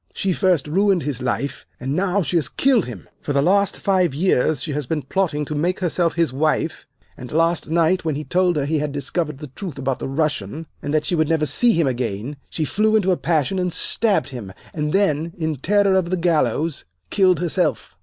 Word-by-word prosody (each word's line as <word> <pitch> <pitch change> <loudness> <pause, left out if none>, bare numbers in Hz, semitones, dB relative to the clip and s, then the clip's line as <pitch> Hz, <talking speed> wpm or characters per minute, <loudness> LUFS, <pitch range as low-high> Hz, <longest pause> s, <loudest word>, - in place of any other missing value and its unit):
She 190 -2 0
first 180 -6 +2
ruined 190 +2 +2
his 135 -3 -3
life, 130 +3 -2 0.2
and 130 +2 -3
now 190 +2 +1
she 175 - -3
has 165 - +1
killed 255 - +2
him. 110 -8 -9
For 145 - -3
the 140 - +3
last 200 +3 +3
five 185 -7 +1
years 155 -3 +1
she 155 - -3
has 145 -2 -3
been 155 -1 -2
plotting 150 -1 -1
to 150 - -5
make 175 +5 0
herself 175 -2 0
his 165 -6 +1
wife, 155 +3 -1 0.3
and 125 -1 -9
last 165 +1 +1
night, 170 +3 +2
when 160 -3 -1
he 150 - -4
told 180 +1 +1
her 145 -2 0
he 155 +1 0
had 150 0 -2
discovered 145 +2 -2
the 150 0 -9
truth 185 -3 -7
about 135 -1 -2
the - - -4
Russian, 150 -1 -2 0.2
and 145 - -4
that 155 0 +1
she - - 0
would 155 -3 +1
never 160 -2 +2
see 230 - +4
him 165 -4 +2
again, 125 +1 -3
she 155 - -2
flew 215 +6 +1
into 195 -3 +3
a - - +3
passion 170 +2 0
and 180 -1 0
stabbed 210 +1 +2
him, 120 -8 -7 0.2
and 150 -1 -2
then, 165 -4 +1
in 160 -3 -2
terror 200 +7 +2
of 185 -2 +1
the 185 - 0
gallows, 160 -3 0 0.3
killed 185 -5 +3
herself. 175 -2 -1
160 Hz, 215 wpm, -21 LUFS, 145-185 Hz, 0.3 s, see